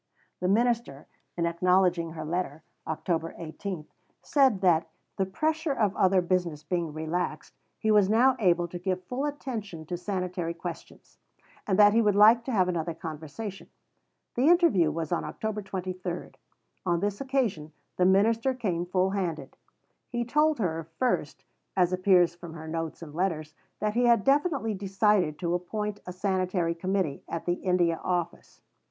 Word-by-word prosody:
The 180 - -1
minister, 225 - +1 0.3
in 170 - +1
acknowledging 175 -1 +2
her 155 -1 -6
letter 160 -2 -3 0.2
(Oct. 165 +1 -2
18), 170 0 -6 0.4
said 265 - +3
that, 165 -3 +3 0.3
the 190 -1 0
pressure 315 - 0
of 210 -6 +1
other 185 0 +4
business 175 -4 -1
being 170 -3 -2
relaxed, 160 +4 -3 0.2
he 220 - +1
was 205 -2 +5
now 245 +4 +5
able 175 -4 +3
to 175 - -6
give 185 0 -2
full 250 +9 -3
attention 220 - -5
to 175 +2 -4
sanitary 180 -2 -3
questions, - - -9 0.5
and 190 -2 +2
that 205 0 +7
he 230 - +4
would 210 -3 +2
like 220 +3 +7
to 265 - -3
have 190 -6 +3
another 170 -2 -2
conversation. 160 +6 -7 0.6
The 255 +4 +2
interview 330 - +5
was 160 +1 -4
on 175 - 0
October 220 -1 -4
23. 185 -2 -5 0.5
On 175 -2 +1
this 205 +3 -2
occasion 245 - -1 0.3
the 180 - +3
minister 225 +7 +3
came 180 -8 -2
full 185 +1 +1
handed. 165 -8 -3 0.5
He 240 -1 -2
told 300 +5 +2
her, 165 -6 -2
first, 255 - -1 0.3
as 180 -1 +3
appears 185 -2 +4
from 175 -1 -10
her 160 -1 -8
notes 165 +1 -4
and 150 -3 -10
letters, 160 -3 -2 0.3
that 210 0 0
he 245 +2 +2
had 235 -4 +4
definitely 280 -5 +2
decided 195 -4 +1
to 170 -2 -1
appoint 205 +4 -3
a - - -4
Sanitary 185 -2 0
Committee 185 -3 -1
at 165 - -4
the 175 - +2
India 175 -2 +1
Office. 175 -2 -3
185 Hz, 160 wpm, -28 LUFS, 170-215 Hz, 0.6 s, that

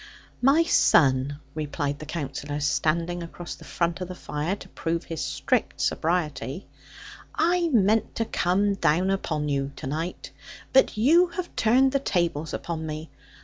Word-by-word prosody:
'My 275 +6 +5
son,' 140 - +3
replied 145 -1 -3
the 155 - -8
Counsellor, 145 -2 -4
standing 165 +4 0
across 170 +1 -7
the - - -13
front 170 +1 -2
of 180 - -3
the 185 - -7
fire, 150 +3 -3
to - - -13
prove 165 +1 -2
his 165 -3 -5
strict - - -1
sobriety: 160 - -1 0.7
'I 345 +1 +2
meant 220 -4 +2
to 225 - 0
come 200 +1 +1
down 185 0 +2
upon 155 -6 -1
you 140 -1 -1
to - - -8
night; 160 +6 -4 0.4
but 265 -4 +4
you 325 +11 +5
have 350 +1 -6
turned 255 +4 +4
the 275 - +1
tables 170 - -1
upon 165 -2 -4
me. 155 +1 -6
170 Hz, 150 wpm, -26 LUFS, 150-205 Hz, 0.7 s, My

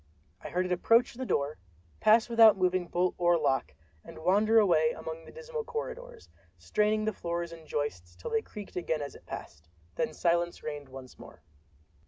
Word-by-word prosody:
I - - -6
heard 180 +1 0
it 180 - -4
approach 230 +7 +3
the 255 +1 -5
door—pass 95 - +1
out - - -19
without 225 -3 +7
moving 185 -1 +1
bolt 180 +1 0
or 175 -1 +4
lock—and 80 - -3
wander 205 +7 +3
away 165 -7 +4
among 160 0 -7
the - - -12
dismal 475 -1 -6
corridors, 480 +1 -6 0.3
straining 215 0 +1
the 215 - 0
floors 170 -1 -4
and 165 -2 -12
joists 90 -12 -4
till 90 - -7
they 225 - +2
creaked 210 -2 -10
again 160 -4 -1
as 140 - -7
it - - -16
passed—and 75 +2 -9 0.4
then - - -13
silence 170 0 0
reigned 145 -2 -6
once 130 -1 -11
more. - - -14
175 Hz, 175 wpm, -30 LUFS, 145-215 Hz, 0.4 s, without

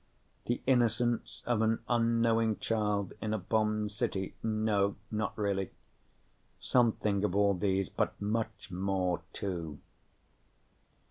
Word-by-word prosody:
The 120 - -1
innocence 120 -2 +1
of 120 -3 +1
an 110 0 +3
unknowing 115 -2 +2
child 105 -3 0
in 110 0 -1
a - - 0
bombed 105 +1 0
city 105 -3 -2
no, 110 -2 +1 0.2
not 110 0 -2
really. 100 -2 0 0.9
Something 110 -5 +2
of 100 -3 0
all 100 0 +4
those, 95 0 +1
but - - -2
much 110 -1 -2
more, 90 -1 0
too. 85 -6 -4
105 Hz, 115 wpm, -31 LUFS, 100-115 Hz, 0.9 s, all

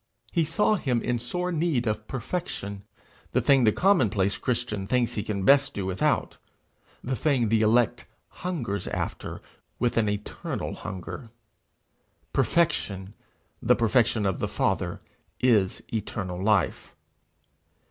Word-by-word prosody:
He 165 - +2
saw 165 +7 +2
him 125 -8 0
in 120 -1 0
sore 180 +10 -2
need 155 -7 +1
of 110 -1 -2
perfection 115 - -4 0.5
the - - +4
thing 135 -3 +4
the 110 - +6
commonplace 110 - +2
Christian 115 -5 -2
thinks 125 +1 +1
he 105 - -2
can 100 -2 -3
best 140 +3 +5
do 100 - -2
without 95 0 0 0.7
the 130 +1 -1
thing 130 -4 +1
the 110 0 +3
elect 115 +2 +2 0.3
hungers 120 - -2
after - - -4 0.3
with 120 -1 0
an 110 -2 +3
eternal 105 0 -4
hunger. 105 +4 -7 1.0
Perfection, 100 - +1 0.5
the - - +4
perfection 115 -1 +2
of 95 -2 0
the - - 0
Father, - - -1 0.4
is 110 -7 +2
eternal 95 -4 -3
life. 105 -1 +1
115 Hz, 125 wpm, -27 LUFS, 100-135 Hz, 1.0 s, the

